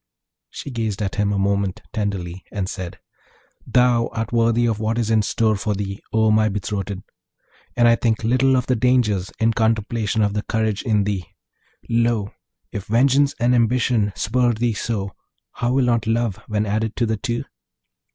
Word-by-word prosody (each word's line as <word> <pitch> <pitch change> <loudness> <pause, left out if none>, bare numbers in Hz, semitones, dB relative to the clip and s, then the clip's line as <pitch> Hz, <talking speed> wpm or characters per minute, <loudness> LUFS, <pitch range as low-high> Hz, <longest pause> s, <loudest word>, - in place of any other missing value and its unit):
She 140 - -7
gazed 110 -5 -2
at 95 - -2
him 105 0 0
a 100 - 0
moment 100 +1 0
tenderly, 95 -4 -3
and 100 -3 -2
said, 90 -2 -6 0.7
'Thou 125 -2 +3
art 115 0 -4
worthy 115 0 +3
of 110 -2 0
what 110 +1 -1
is 115 -2 0
in 110 -1 +4
store 110 +1 +1
for 105 +1 -2
thee, 100 0 -4
O 110 -1 +3
my 110 0 +3
betrothed! 100 -1 -4 0.7
and 120 -1 +5
I 115 - +6
think 115 -1 0
little 130 +3 +3
of 125 - 0
the 130 - +1
dangers, 110 -6 +1
in 115 +1 +3
contemplation 110 -1 0
of 105 -1 +1
the 105 - -1
courage 110 -1 -1
in 105 -4 +1
thee. 100 -3 -2 0.6
Lo, 115 -3 +1 0.4
if 100 - -5
vengeance 135 +5 +3
and 120 +1 +3
ambition 120 -2 +2
spur 120 +2 +1
thee 115 +1 0
so, 100 -2 -3 0.4
how 120 +1 -1
will 135 -1 +3
not 115 -3 +1
love 115 -3 0
when 105 0 0
added 110 +2 -1
to 120 - +1
the 110 -1 -1
two?' 120 +3 -2
110 Hz, 175 wpm, -21 LUFS, 105-120 Hz, 0.7 s, I